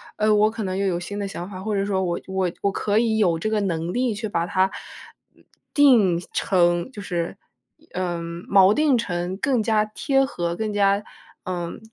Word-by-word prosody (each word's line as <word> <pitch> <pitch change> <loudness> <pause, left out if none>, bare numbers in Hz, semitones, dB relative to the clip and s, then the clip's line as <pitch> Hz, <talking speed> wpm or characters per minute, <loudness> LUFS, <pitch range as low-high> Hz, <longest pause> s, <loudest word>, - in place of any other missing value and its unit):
呃， 215 0 +2
我 210 +1 +4
可 220 0 -5
能 185 -1 -2
又 200 - 0
有 180 -2 0
新 205 +3 -6
的 200 - -2
想 180 -1 -6
法， 185 -2 -8
或 210 +1 -2
者 195 0 0
说 195 -2 0
我 175 -1 -1
我 190 -1 0
我 200 - +1
可 205 +2 0
以 225 -1 +2
有 180 -6 +2
这 190 +7 -2
个 215 -1 +1
能 170 -3 -2
力， 250 -2 0
去 220 +1 -4
把 170 -3 -1
它， 185 +1 +2 0.7
呃， - - -25 0.3
定 235 - +5 0.2
成 175 +1 +2
就 205 - -7
是， 175 -3 -3 0.4
一 320 +1 -27
嗯， 170 -1 -4
锚 195 0 +6
定 295 0 +3
成 180 -5 -2
更 255 +1 +1
加 215 -1 +2
贴 270 +6 +1
合， 170 -9 -3
更 215 +2 -3
加 200 0 +2 0.4
嗯， 175 -2 -4
200 Hz, 215 characters per minute, -23 LUFS, 175-215 Hz, 0.7 s, 锚